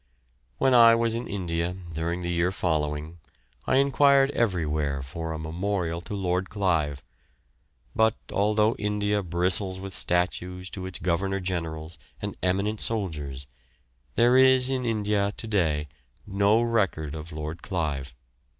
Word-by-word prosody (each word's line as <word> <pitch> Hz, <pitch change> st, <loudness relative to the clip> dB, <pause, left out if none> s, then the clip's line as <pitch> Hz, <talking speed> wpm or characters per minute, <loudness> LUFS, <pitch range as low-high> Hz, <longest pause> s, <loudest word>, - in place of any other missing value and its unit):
When 130 Hz, -, +3 dB
I 115 Hz, -1 st, +8 dB
was 115 Hz, -1 st, +1 dB
in 120 Hz, +1 st, -3 dB
India 90 Hz, -2 st, -2 dB, 0.2 s
during 85 Hz, +3 st, -2 dB
the 85 Hz, -, -2 dB
year 85 Hz, +1 st, +1 dB
following 75 Hz, -2 st, -2 dB, 0.5 s
I -, -, +3 dB
enquired 140 Hz, 0 st, +4 dB
everywhere 75 Hz, -, 0 dB
for 80 Hz, +5 st, -5 dB
a 80 Hz, -, -3 dB
memorial 85 Hz, +1 st, -2 dB
to 100 Hz, -, -6 dB
Lord 95 Hz, -1 st, -1 dB
Clive, 80 Hz, -8 st, 0 dB, 0.9 s
but, 110 Hz, +1 st, +3 dB, 0.2 s
although 105 Hz, +2 st, +3 dB
India 105 Hz, 0 st, 0 dB
bristles 95 Hz, +2 st, 0 dB
with 95 Hz, 0 st, -7 dB
statues 90 Hz, +1 st, -1 dB
to 95 Hz, -1 st, -5 dB
its 95 Hz, -, -5 dB
governor 95 Hz, +3 st, -1 dB
generals 80 Hz, -3 st, -4 dB, 0.2 s
and -, -, -5 dB
eminent 100 Hz, +4 st, 0 dB
soldiers, 75 Hz, -11 st, -3 dB, 0.7 s
there 120 Hz, +2 st, +4 dB
is 130 Hz, 0 st, +6 dB
in 130 Hz, -1 st, -1 dB
India 105 Hz, -3 st, 0 dB
to -, -, -3 dB
day 80 Hz, -8 st, 0 dB, 0.4 s
no 100 Hz, +3 st, +3 dB
record 95 Hz, -10 st, 0 dB
of 80 Hz, +1 st, -7 dB
Lord 75 Hz, +2 st, -6 dB
Clive. 75 Hz, -8 st, -3 dB
90 Hz, 135 wpm, -26 LUFS, 80-105 Hz, 0.9 s, I